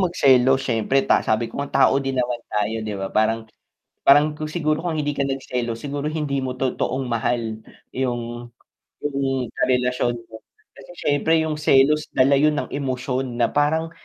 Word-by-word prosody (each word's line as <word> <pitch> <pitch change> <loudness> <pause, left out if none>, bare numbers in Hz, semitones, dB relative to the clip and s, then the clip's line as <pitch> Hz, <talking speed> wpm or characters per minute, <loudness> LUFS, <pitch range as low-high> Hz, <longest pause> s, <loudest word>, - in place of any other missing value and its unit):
magselos 135 -7 +3
siyempre 125 +3 +1
ta - - +3
sabi 110 +2 0
ko 140 - -5
nga 140 -1 +3
tao - - +2
din 135 -1 -2
naman 120 -1 -1
tayo, 105 +1 -1
'di 105 -1 -4
ba 95 - -3
parang 110 +1 +1 0.6
parang 150 +2 +5
kung 155 - -4
siguro 155 +3 -1
kung 165 -2 -1
hindi 145 0 -2
ka 140 - +1
nagselos 125 -4 -3
siguro 145 0 -4
hindi 150 -2 -2
mo 125 - -3
totoong 130 0 -2
mahal 115 -1 -1 0.3
yung 120 -2 -4 0.5
yung 135 -3 -2
karelasyon 125 -1 +1
mo, 110 0 -12 0.3
kasi 135 +4 -13
siyempre 160 +3 +2
yung 160 -1 -1
selos 150 0 +3
dala 135 +2 +4
yun 150 +1 +3
ng 145 - -3
emosyon 130 -2 -3
na 120 - +4
parang, 160 +3 +1
135 Hz, 165 wpm, -22 LUFS, 120-145 Hz, 0.6 s, parang